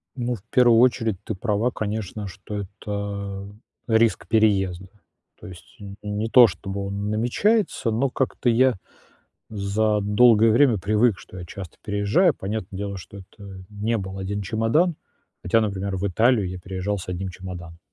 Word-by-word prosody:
Ну, 120 -1 -2
в 100 - -14
первую 120 -2 +5
очередь 115 -5 +2
ты 110 - -4
права, 110 +4 0
конечно, 105 -1 -4
что 95 +3 -9
это 100 -1 -5 0.4
риск 110 -3 +2
переезда. 95 -4 +1 0.5
То - - -11
есть 90 -3 -14
н 100 -1 -9
не 105 +2 -3
то 125 -1 +8
чтобы 95 +1 -5
он 100 +1 -3
намечается, 125 - +1
но 130 +5 +1
как-то 125 -1 -1
я 125 +2 +4 0.8
за 105 +1 0
долгое 110 +2 +5
время 120 -4 +4
привык, 105 +2 +2
что 95 - -12
я 90 - -7
часто 95 -1 -9
переезжаю. 105 - +2
Понятное 95 -1 -5
дело, 100 -1 -4
что 100 +3 -11
это 95 0 -12
не 105 +2 -2
был 95 0 -6
1 100 +2 -3
чемодан. 115 - +1 0.5
Хотя, 115 +5 +3
например, 100 -2 -2
в 100 +2 -2
Италию 110 0 +2
я 90 - -6
переезжал 95 +2 -3
с 90 - -9
1 90 +1 -3
чемоданом. 90 -2 -9
105 Hz, 155 wpm, -23 LUFS, 95-115 Hz, 0.8 s, то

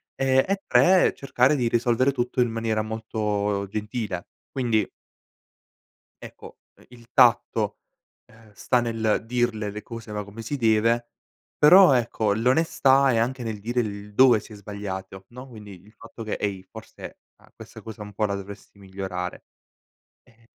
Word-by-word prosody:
e 130 0 +2
e 195 0 -1
3 185 0 +4
cercare 135 0 +1
di 120 -3 0
risolvere 120 +3 +2
tutto 125 0 -3
in 120 - +2
maniera 115 -1 -1
molto 105 -2 -2
gentile 105 -4 -4 0.2
quindi 120 -5 0 1.4
ecco, - - -12 0.2
ehm, - - -22
il 120 -1 -16
tatto, 115 -3 +3 0.5
ehm, 110 -1 -20
sta 125 +4 0
nel 115 -2 -1
dirle 115 -3 -1
le 105 +1 -7
cose 115 -2 -10
va 105 0 -3
come 105 +3 -10
si 115 +6 -4
deve. 115 -1 +1 0.5
Però 180 +3 +7
ecco 115 -4 0
l'onestà 135 +3 +3
è 115 - +1
anche 125 +2 -1
nel 110 -3 -5
dire 120 +4 -1
il 105 -1 -7
dove 125 0 +6
si 110 - -13
è - - -10
sbagliato, 95 -2 -7
no, 125 +2 -11
quindi 105 -6 -12
il 105 - -19
fatto 115 0 -11
che: 110 - -4
"Ehi 100 -2 -3
forse 110 +4 -12 0.2
a - - -23
questa - - -12
cosa 110 -2 -10
un 105 0 -11
po' 105 +2 0
la 100 -1 -2
dovresti 100 +1 -10
migliorare," 95 -2 -6 0.8
ehm 115 -2 -27
110 Hz, 155 wpm, -24 LUFS, 105-120 Hz, 1.4 s, Però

